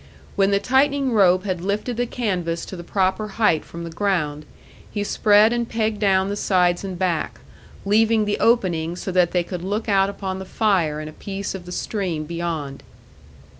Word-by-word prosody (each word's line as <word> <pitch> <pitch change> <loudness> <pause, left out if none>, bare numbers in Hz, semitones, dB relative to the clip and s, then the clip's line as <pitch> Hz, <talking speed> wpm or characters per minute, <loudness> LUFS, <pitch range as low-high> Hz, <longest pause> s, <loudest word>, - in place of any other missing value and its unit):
When 195 -1 +3
the 200 - +3
tightening 270 +2 +2
rope 185 -4 +4
had 185 -4 -3
lifted 205 +6 -2
the 245 +1 -1
canvas 180 -9 -2
to - - -8
the 175 - -8
proper 190 +3 0
height 210 -9 +3
from 170 0 -9
the 170 - -6
ground, 160 -5 -1 0.4
he 205 - -3
spread 210 +2 +4
and 235 -1 -2
pegged 220 -2 -1
down 190 -2 +3
the 200 - -2
sides 180 -3 +1
and 190 -2 -5
back, 175 -3 -1 0.5
leaving 220 +1 +3
the 205 - -1
opening 175 -8 +1
so 185 - -5
that 180 -1 +3
they 180 -1 0
could 175 0 -6
look 205 +4 -2
out 195 -1 +3
upon 190 -2 -5
the 190 - -6
fire 185 -8 +1
and 155 - -6
a 155 - -9
piece 195 +3 -5
of 180 -2 -8
the - - -7
stream 180 -5 -3
beyond. 160 -4 -4
190 Hz, 190 wpm, -22 LUFS, 175-210 Hz, 0.5 s, rope